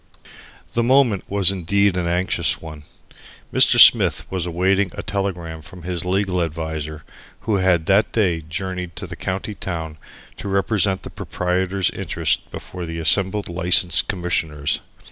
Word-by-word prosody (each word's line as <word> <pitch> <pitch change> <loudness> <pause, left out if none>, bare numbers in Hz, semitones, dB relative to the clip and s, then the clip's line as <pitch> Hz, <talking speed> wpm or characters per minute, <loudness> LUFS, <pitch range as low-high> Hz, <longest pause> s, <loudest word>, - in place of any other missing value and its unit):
The 120 - +1
moment 120 -4 +3
was 100 -1 +3
indeed 100 +1 +1
an 90 -2 -1
anxious 90 +2 0
one. 75 -2 -10 0.7
Mr. - - +5
Smith - - +7
was 90 -2 -2
awaiting 95 +3 +1
a - - -6
telegram 90 -6 -4
from 85 +3 -13
his 90 -1 -2
legal 95 -1 0
adviser 80 -2 -4 0.4
who 110 -3 0
had 90 -4 +2
that 100 +4 +3
day 90 -7 +1
journeyed 90 +2 -5
to - - -6
the - - -8
county 95 +3 -4
town 80 -5 -6 0.4
to - - -7
represent 95 0 0
the - - -8
proprietor's 90 +1 -1
interest - - -1
before 90 -2 -8
the 80 0 -6
assembled 95 +5 +1
License 85 0 +3
Commissioners. 80 -6 -2
90 Hz, 145 wpm, -21 LUFS, 85-100 Hz, 0.7 s, Smith